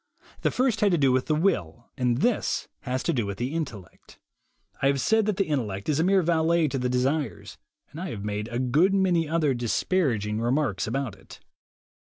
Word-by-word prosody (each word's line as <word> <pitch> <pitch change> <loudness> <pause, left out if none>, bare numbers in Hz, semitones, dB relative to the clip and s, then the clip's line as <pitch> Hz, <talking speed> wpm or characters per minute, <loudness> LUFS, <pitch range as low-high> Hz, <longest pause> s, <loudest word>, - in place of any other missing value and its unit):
The - - +2
first 250 -4 0
had 205 -2 +4
to - - +3
do 135 -3 +3
with 130 0 +1
the 155 - +2
will, 120 - -1
and 125 0 0
this 240 -3 0
has 130 0 -3
to - - 0
do 115 -6 -1
with 100 -1 -4
the 125 +5 -3
intel 135 - -3
lect. - - -21 0.6
I 135 - +3
have 140 0 +2
said 220 +7 +2
that 210 -3 0
the 195 - +2
intellect 110 - -2
is 150 0 +1
a - - +3
mere 190 +1 +3
valet 165 0 +2
to 135 - -2
the 125 0 -1
desires, 130 +1 -2 0.3
and 155 - -8
I 185 - -4
have 105 -7 -6
made 105 +1 -3
a 120 - -4
good 150 +10 +3
many 175 -5 +2
other 155 -4 +2
disparaging 120 - 0
remarks 120 -4 0
about 125 -2 -2
it. 95 - -15
140 Hz, 210 wpm, -26 LUFS, 120-170 Hz, 0.6 s, had